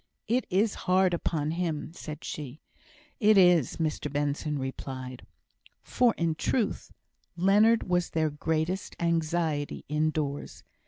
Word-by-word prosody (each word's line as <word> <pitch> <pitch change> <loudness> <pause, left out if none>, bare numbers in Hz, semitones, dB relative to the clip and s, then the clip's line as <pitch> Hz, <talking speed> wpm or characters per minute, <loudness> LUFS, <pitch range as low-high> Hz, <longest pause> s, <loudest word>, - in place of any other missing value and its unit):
"It 250 +3 +1
is 200 +3 +2 0.2
hard 185 0 +4
upon 155 -3 -1
him," 165 -3 -2
said 155 -3 -8
she. 145 -1 -6 0.6
"It 215 -2 +5
is," 175 -7 +5
Mr 155 -3 -2
Benson 145 +1 -1
replied. 130 -1 -6 0.6
For 245 -2 +2
in 165 -1 +1
truth, 210 +7 -1 0.5
Leonard 205 +6 +4
was 180 -1 +1
their 155 -1 0
greatest 160 +5 -2
anxiety 165 -3 -1
indoors. 150 -1 -2
160 Hz, 115 wpm, -28 LUFS, 150-185 Hz, 0.6 s, It